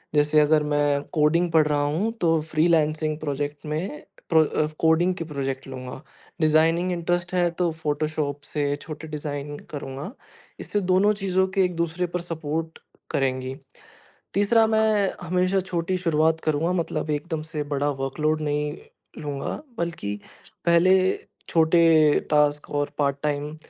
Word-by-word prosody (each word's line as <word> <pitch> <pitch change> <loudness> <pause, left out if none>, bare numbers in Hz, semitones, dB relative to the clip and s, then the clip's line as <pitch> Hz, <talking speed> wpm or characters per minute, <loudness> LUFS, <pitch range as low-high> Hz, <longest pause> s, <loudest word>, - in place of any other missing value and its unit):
जैसे 150 +1 +4
अगर 150 0 +4
मैं 145 -1 +1
कोडिंग 165 +3 +3
पढ़ 155 -2 +4
रहा 150 -1 +1
हूँ 165 +10 0
तो 165 -2 +3
फ्रीलांसिंग 155 -1 +1
प्रोजेक्ट 145 0 -4
में 155 +1 -4 0.3
प्र - - +6
अ, 150 +1 0
कोडिंग 165 +3 +3
के 170 - -4
प्रोजेक्ट 135 -3 -4
लूँगा। 130 0 -7 0.4
डिजाइनिंग 165 +3 +3
इंट्रेस्ट 175 +1 -1
है 175 -1 +3
तो 175 -2 +2
फ़ोटोशॉप 150 -2 -2
से 145 -1 -1
छोटे 160 0 -8
डिज़ाइन 145 -1 -5
करूँगा। 140 - -6 0.5
इससे 205 - -2
दोनों 200 +3 +4
चीज़ें 190 -1 +2 0.2
एक-दूसरे 170 0 -1
पर 180 - 0
सपोर्ट 160 -1 -4 0.3
करेंगी। 130 -1 -1 0.8
तीसरा, 220 +3 +4
मैं 220 -3 +2
हमेशा 185 +2 +1
छोटी 185 -1 -2
शुरुआत 160 -2 +2
करूँगा। 160 +3 +1
मतलब 170 -3 -2
एकदम 155 +2 -2
से 150 - -1
बड़ा 140 +1 +1
वर्कलोड 155 +3 0
नहीं 150 0 -1 0.5
लूँगा। 145 - -4 0.2
बल्कि 170 -12 -3 0.5
पहले 170 +2 +5 0.6
छोटे 165 +1 +4 0.5
टॉस्क 150 0 +2
और 145 0 -1
पार्ट-टाइम 145 +1 -1
155 Hz, 130 wpm, -24 LUFS, 145-170 Hz, 0.8 s, प्र